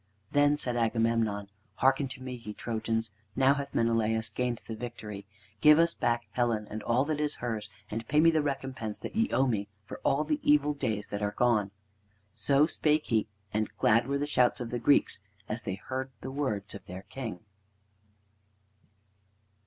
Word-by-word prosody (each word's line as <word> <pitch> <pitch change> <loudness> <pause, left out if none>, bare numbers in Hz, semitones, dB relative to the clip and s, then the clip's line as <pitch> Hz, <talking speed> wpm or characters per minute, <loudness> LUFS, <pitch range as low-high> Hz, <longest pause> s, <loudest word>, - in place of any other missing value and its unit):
Then 145 0 +4
said 125 -4 -2
Agamemnon: 115 -3 +1 0.3
"Hearken 135 +2 +3
to 130 0 -9
me, 130 -1 -5
ye 115 -4 -7
Trojans. 115 0 -2 0.2
Now 135 +1 +5
hath 140 0 -5
Menelaus 115 -1 +1
gained 125 -2 -1
the 115 - -5
victory. 105 -4 -7 0.3
Give 150 +6 +7
us 170 0 +4
back 120 0 0
Helen, 115 -4 0
and 110 +1 -4
all 120 +5 +2
that 155 0 -1
is 150 0 0
hers, 110 -3 -4 0.2
and 115 +2 -4
pay 150 - +3
me 165 +1 +7
the 160 -1 +2
recompense 135 -6 -3
that - - -6
ye 225 +2 +2
owe 135 - +3
me 105 -5 0 0.2
for - - -8
all 140 +3 +2
the 150 -1 0
evil 150 0 +4
days 110 -7 -2
that 100 - -3
are 105 0 -1
gone." 115 -5 +3 0.6
So 135 +7 +3
spake 155 -1 +1
he, 110 -3 +1 0.3
and 110 0 0
glad 115 +3 +4
were 140 +1 0
the 145 - -1
shouts 130 -3 +2
of 120 -2 -5
the 120 - -1
Greeks 140 +5 +3 0.3
as 110 +3 -3
they 100 -4 -3
heard 130 +6 -4
the 130 - -5
words 110 -9 -2
of - - -9
their 90 +2 -7
king. 115 -9 -6
120 Hz, 180 wpm, -30 LUFS, 110-140 Hz, 0.6 s, Give